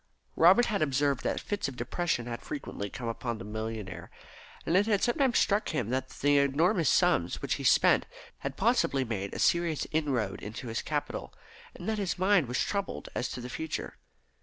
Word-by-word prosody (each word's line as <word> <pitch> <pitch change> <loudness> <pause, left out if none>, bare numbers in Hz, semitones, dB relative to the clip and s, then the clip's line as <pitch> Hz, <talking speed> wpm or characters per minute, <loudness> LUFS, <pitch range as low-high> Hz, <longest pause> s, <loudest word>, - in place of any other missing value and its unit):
Robert 185 +9 +6
had 210 -6 -1
observed 140 -2 +1
that - - -1
fits 205 -6 -2
of 135 - -6
depression 120 +1 -1
had 120 -1 -5
frequently 275 - -5
come 120 +2 -6
upon 115 0 -3
the - - -8
millionaire, 110 -1 -5 0.6
and 165 - +1
it 200 +3 +4
had 205 -3 +2
sometimes 255 0 +2
struck 205 +1 +2
him 135 -8 -2
that 130 0 -1
the 145 0 +2
enormous 160 +5 +2
sums 175 - +2
which - - 0
he - - -5
spent - - +4 0.3
had - - -5
possibly 135 -1 +2
made 100 -5 -3
a - - -6
serious 170 -3 +2
inroad 130 -11 -1
into 115 +4 -7
his 115 - -2
capital, 150 -1 -4 0.4
and - - -8
that 220 -1 0
his 190 -5 -1
mind 185 -5 +3
was 125 +1 -2
troubled 200 -1 -2
as 125 - -2
to 125 - -6
the 125 - -6
future. 160 +5 -5
145 Hz, 185 wpm, -29 LUFS, 120-180 Hz, 0.6 s, Robert